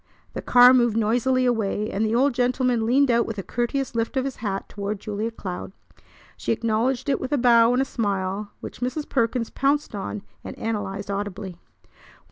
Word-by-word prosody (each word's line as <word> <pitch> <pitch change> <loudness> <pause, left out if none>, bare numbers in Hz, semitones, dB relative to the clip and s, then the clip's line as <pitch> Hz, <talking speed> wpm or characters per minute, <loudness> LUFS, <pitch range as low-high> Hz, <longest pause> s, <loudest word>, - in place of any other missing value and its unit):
The - - -4
car 250 +1 +7
moved 240 -3 +3
noisily 245 +4 +2
away, 215 -3 0
and 205 - -1
the 220 +1 +1
old 270 +2 +3
gentleman 245 -2 +1
leaned 265 +2 +4
out 235 0 +2
with 225 - -5
a 195 - -4
courteous 250 +5 -2
lift 230 +3 -2
of 260 - +1
his 275 - -4
hat 200 -3 -3
toward 205 0 -4
Julia 210 +2 -3
Cloud. 190 -4 -7 0.6
She - - -3
acknowledged 235 +4 0
it 280 - 0
with 260 - -4
a 290 - +2
bow 235 -2 +5
and 255 +2 +2
a - - -4
smile 200 -4 -2
which - - -8
Mrs. 255 +5 -2
Perkins 230 -2 0
pounced 280 +1 0
on 205 0 -5 0.2
and - - -8
analyzed 205 -3 -3
audibly. 200 -2 -5
230 Hz, 185 wpm, -24 LUFS, 205-255 Hz, 0.6 s, car